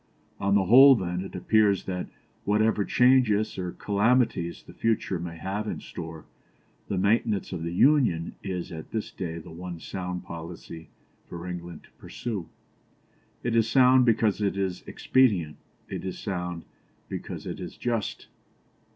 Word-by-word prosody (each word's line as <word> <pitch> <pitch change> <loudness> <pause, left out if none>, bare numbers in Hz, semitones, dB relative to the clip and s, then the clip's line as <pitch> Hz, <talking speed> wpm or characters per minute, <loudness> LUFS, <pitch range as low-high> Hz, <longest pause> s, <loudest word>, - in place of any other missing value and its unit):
"On 100 0 +2
the 100 - +4
whole, 135 +8 +9
then, 90 -4 -2
it 95 - -9
appears 100 +1 +3
that, 90 -1 -4 0.4
whatever 105 0 +2
changes 125 -3 +3
or 90 -1 -3
calamities 105 -4 +1
the - - -14
future 110 -5 0
may 85 -1 -6
have 100 +6 -3
in - - -3
store, 80 -2 -8 0.6
the 100 - -2
maintenance 100 0 +1
of 90 - -4
the 85 +1 -3
Union 115 - +3
is 90 -3 -4
at 80 -2 -8
this 110 -2 -4
day 85 -3 -5
the 80 - -10
one 85 0 -7
sound 90 0 -5
policy 85 0 -9 0.4
for 85 0 -7
England 85 -2 -7
to - - -21
pursue. 105 -8 -5 0.9
It 120 -1 0
is 115 -1 +3
sound 130 0 +6
because 110 -3 +2
it 100 -1 0
is 95 -2 -2
expedient; 100 -13 +2 0.3
it - - -5
is 95 - -4
sound 90 -4 -4 0.4
because - - -6
it - - -5
is - - -7
just." 115 -4 -2
95 Hz, 150 wpm, -27 LUFS, 85-110 Hz, 0.9 s, whole